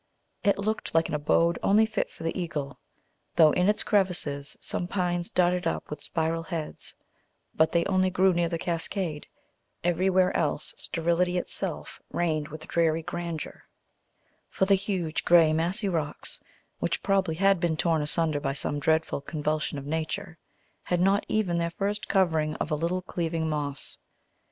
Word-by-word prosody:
It 200 -2 +3
looked 215 -3 -2
like 165 0 +3
an - - -4
abode 165 +3 +2
only 215 +3 +4
fit 220 -1 -2
for - - -12
the 165 - -2
eagle, 145 -7 -4 0.6
though 160 -2 +7
in 180 +5 +2
its 210 - +1
crevices 175 -8 0
some 175 - -3
pines 175 -2 -1
darted 180 -1 +2
up - - -2
their 150 - -5
spiral 165 +2 -1
heads; 165 -2 -6 0.6
but 160 - +3
they 170 -1 +2
only 185 -1 +2
grew 185 +1 +3
near 170 -1 +1
the 170 - -1
cascade, 165 -1 -3 0.6
everywhere 185 +2 +2
else - - 0
sterility 170 +2 0
itself 180 - -4
reigned 155 -3 0
with 155 +1 -9
dreary 165 -1 +1
grandeur; 170 -1 -5 0.8
for 190 - +1
the 200 - +4
huge 190 -5 -1
grey 165 -3 +6
massy 180 +7 0
rocks, 160 -5 -2 0.4
which - - -1
probably 190 -5 +1
had 195 +1 +3
been 165 -2 0
torn 165 -2 +2
asunder 150 0 +4
by 135 -1 -1
some 145 +1 -2
dreadful 160 0 +1
convulsion 155 0 -2
of 140 - -6
nature, 160 +1 -3 0.4
had 175 - -1
not 195 +3 +3
even 185 -6 +1
their 170 0 0
first 205 +4 -3
covering 160 -5 +2
of 155 - -3
a - - +3
little 170 +4 -1
cleaving 165 -2 -2
moss. 145 -2 -3
170 Hz, 160 wpm, -27 LUFS, 155-185 Hz, 0.8 s, though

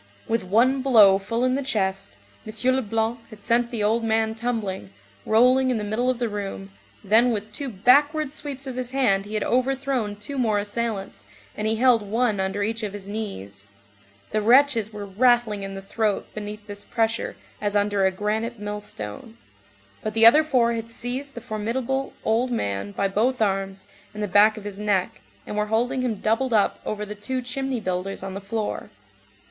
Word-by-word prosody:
With 225 -2 0
one 240 +8 +3
blow 215 -7 +6
full 230 +5 -2
in 255 0 +2
the 275 - 0
chest, 190 - -2 0.3
M. 225 +4 +1
Leblanc 225 -1 -1
had 215 -3 -14
sent 235 0 +2
the 230 -4 -2
old 225 +3 +2
man 220 0 +1
tumbling, 220 - -3 0.4
rolling 250 +4 +4
in 250 - +1
the 210 - -3
middle 220 +5 0
of 255 - 0
the 240 -1 -1
room, 195 - -5 0.3
then 225 +5 +5
with 215 -2 -3
two 275 +4 -3
backward 285 - +3
sweeps 285 -3 -5
of 260 -2 -6
his 255 0 -3
hand 200 -8 +2
he 210 +1 -6
had 215 - 0
overthrown 255 -4 0
two 260 +7 -5
more 220 -4 +2
assailants, 205 -1 -3 0.3
and 215 - -2
he 220 - +2
held 245 0 +4
one 215 +1 0
under 190 +2 -1
each 225 +2 -2
of 210 -2 -4
his 200 -1 -8
knees; 105 - -6 0.6
the 215 - +1
wretches 235 -1 +4
were 210 -1 -6
rattling 225 0 +2
in 195 0 -6
the 195 - -7
throat 210 +1 -1
beneath 210 0 -7
this 205 -1 -7
pressure 225 +1 -1 0.3
as 205 -1 -1
under 205 -1 +2
a 190 - +5
granite 215 +5 -2
millstone; 205 - -6 0.6
but 215 0 -4
the 225 0 +6
other 295 +7 +8
four 245 -6 +2
had 230 0 -4
seized 250 +4 -5
the 235 - -6
formidable 240 +4 -2
old 230 +3 +2
man 100 - -2
by 195 - 0
both 230 +6 0
arms 195 -2 -1 0.3
and 210 - -3
the - - -1
back 210 +3 +5
of 215 - -8
his 205 -1 -6
neck, 200 -3 0 0.2
and - - -6
were 210 0 0
holding 245 +4 0
him 245 -3 -1
doubled 225 +5 0
up 210 -2 +2
over 210 0 -3
the 210 - -6
two 210 +5 -3
"chimney 255 0 -3
builders" 185 -1 -3
on 195 0 -5
the 195 - -6
floor. 210 +2 -4
220 Hz, 190 wpm, -24 LUFS, 205-245 Hz, 0.6 s, other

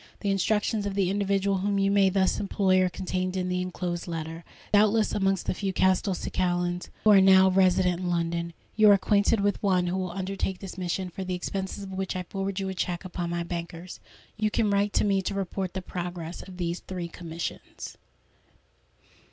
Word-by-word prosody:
The 200 - 0
instructions 210 +2 +1
of 195 - -3
the 190 -2 +1
individual 200 -1 +1
whom 200 +1 0
you 195 0 +2
may 200 -1 +4
thus 190 0 +1
employ 190 -2 +2
are 185 - +2
contained 185 0 -3
in 185 0 -1
the 180 0 0
enclosed 180 -1 -4
letter. 165 0 -5 0.3
Doubtless, 215 +1 +4
amongst 195 -2 +1
the - - 0
few 195 +1 -2
Castelcicalans 180 -1 0
who 215 - +6
are 195 -2 +8
now 190 0 +6
resident 185 -1 +3
in 180 -1 -2
London, 170 0 -1 0.2
you 215 -1 +6
are - - +9
acquainted 200 +2 +2
with 205 0 0
one 185 -3 +2
who 175 +1 -1
will 185 -1 -2
undertake 190 +1 -3
this 195 0 -8
mission, 185 0 -3
for 190 +2 -5
the 185 -1 -2
expenses 190 +2 -4
of 195 - -8
which 190 0 -3
I 185 - -2
forward 195 +1 -3
you 195 - -2
a 190 - -3
cheque 180 0 -3
upon 175 -1 -4
my 170 0 -2
bankers. 170 +1 -6 0.4
"You 215 0 +1
can 210 0 +1
write 200 +1 +2
to - - +3
me 195 -1 +2
to 195 +1 -3
report 190 -1 -3
the 190 - -3
progress 175 -2 -5
of 185 -1 -11
these 175 -1 -2
three 180 -2 -5
commissions." 170 -1 -7
190 Hz, 195 wpm, -27 LUFS, 180-195 Hz, 0.4 s, are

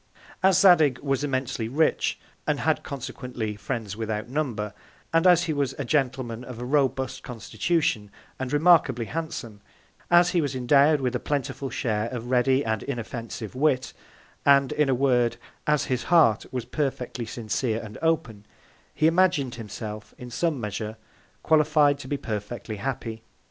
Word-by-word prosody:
As 190 -2 +5
Zadig 160 -9 +6
was 135 0 0
immensely 130 -5 -2
rich, 155 +6 +1 0.3
and - - 0
had - - +1
consequently 125 -5 -5
Friends 105 -1 -4
without 110 -1 -3
Number; 120 -8 -2 0.4
and 165 +2 +4
as 175 -1 +6
he 165 -2 -1
was 140 -3 -1
a 140 - -3
Gentleman 125 -4 -1
of 125 -2 -8
a 120 - -5
robust 130 -1 0
Constitution, 115 -1 -1 0.3
and 130 -1 -3
remarkably 145 -6 +4
handsome; 125 -9 -5 0.5
as 175 +1 +5
he 175 - +2
was 140 -3 -2
endowed 140 +4 +4
with 125 -1 -1
a - - 0
plentiful 140 -1 -3
Share 110 -2 -1
of 120 0 -6
ready 130 +2 +3
and 110 -1 -1
inoffensive 115 -4 -5
Wit: 130 -1 +1 0.5
And, 140 -1 +5
in 150 -2 +1
a 130 - +3
Word, 125 -3 +2 0.3
as 150 -1 +2
his 125 -2 -2
Heart 155 -11 +4
was 125 -2 -3
perfectly 125 -3 -3
sincere 115 0 -2
and 105 -2 -9
open, 125 -11 -1 0.5
he 155 - +1
imagin'd 165 -6 +3
himself, 110 -1 -7
in 125 -1 -9
some 160 +2 0
Measure, 105 0 -4 0.5
qualified 150 -2 +4
to 130 - -8
be 145 - -1
perfectly 110 -1 -5
happy. 115 -1 -4
130 Hz, 155 wpm, -26 LUFS, 115-145 Hz, 0.5 s, Zadig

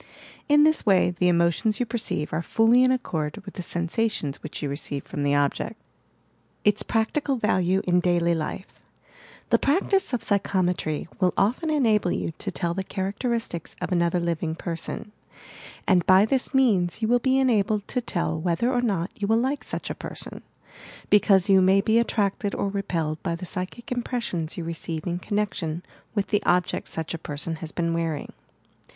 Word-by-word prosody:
In 295 0 +6
this 310 0 +3
way 190 -3 +4
the 180 +1 0
emotions 170 +5 +2
you 245 - +1
perceive 220 -10 -3
are 155 - 0
fully 225 +7 +4
in 255 - +4
accord 160 -12 -2
with 195 - -8
the - - -5
sensations 170 - -1
which 155 - -6
yon 145 - -1
receive 140 -1 -4
from 145 - -5
the 145 0 +2
object, 145 -1 0 0.9
ITS 210 0 +4
PRACTICAL 265 +5 0
VALUE 190 -5 +1
IN 180 0 +3
D 175 0 +2
ULT 170 0 +2
LIFE 165 +4 -5 0.7
The - - +5
practice 380 +5 +2
of 245 - -1
psychometry 180 -6 0
will 185 -2 +2
often 240 - +1
enable 220 -11 +2
you - - -2
to - - -3
tell 170 -2 -2
the 190 +2 -3
characteristics 200 0 -3
of - - -4
another 170 0 +2
living 170 -1 -2
person, 165 +5 -4 0.8
and 185 -4 +4
by 190 +2 +7
this 260 +3 0
means 220 -7 +2
you - - +3
will 245 +2 +4
be 260 +2 +2
enabled 215 -5 +2
to 250 - -1
tell 165 -8 -2
whether 180 +9 +1
or 245 - +2
not 195 -7 -1
you 205 - -3
will 225 +1 +3
like 265 +5 0
such - - -4
a - - -1
person, - - -5 0.4
— - - -19 0.3
because 200 -3 +5
you 195 -1 +6
may 190 +1 +5
be 220 +3 +3
attracted 205 -3 0
or 200 - -1
repelled 165 -6 -2
by 170 -3 -2
the 170 - -7
psychic 185 +8 -5
impressions 235 -10 -3
you 175 - -3
re 165 +1 -3
ceive 160 -1 -5
in 175 -1 -2
connection 185 -5 -2 0.3
with 205 -2 0
the 210 - +2
object 180 0 +1
such 160 0 -4
a 165 - -4
person 155 +3 -4
has 160 -1 -7
been 170 -1 -1
wearing. 165 -3 -2
190 Hz, 180 wpm, -25 LUFS, 170-225 Hz, 0.9 s, by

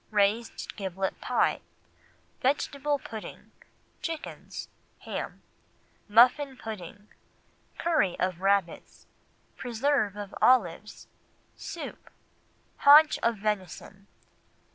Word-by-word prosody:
Raised 210 +2 0
Giblet 190 -1 -3
Pie. - - +1 0.8
Vegetable 285 +2 0
Pudding. 220 -5 -9 0.5
Chickens. 325 -2 -6 0.3
Ham. - - -6 0.6
Muffin 250 +5 +4
Pudding. 205 -3 -9 0.7
Curry 315 - +1
of 185 -1 -1
Rabbits. 195 -3 -1 0.5
Preserve 245 -3 0
of 205 -1 -7
Olives. 210 -5 +2 0.5
Soup. - - -8 0.7
Haunch 300 +2 +7
of 230 -1 0
Venison. 195 -1 -4
215 Hz, 75 wpm, -28 LUFS, 195-265 Hz, 0.8 s, Haunch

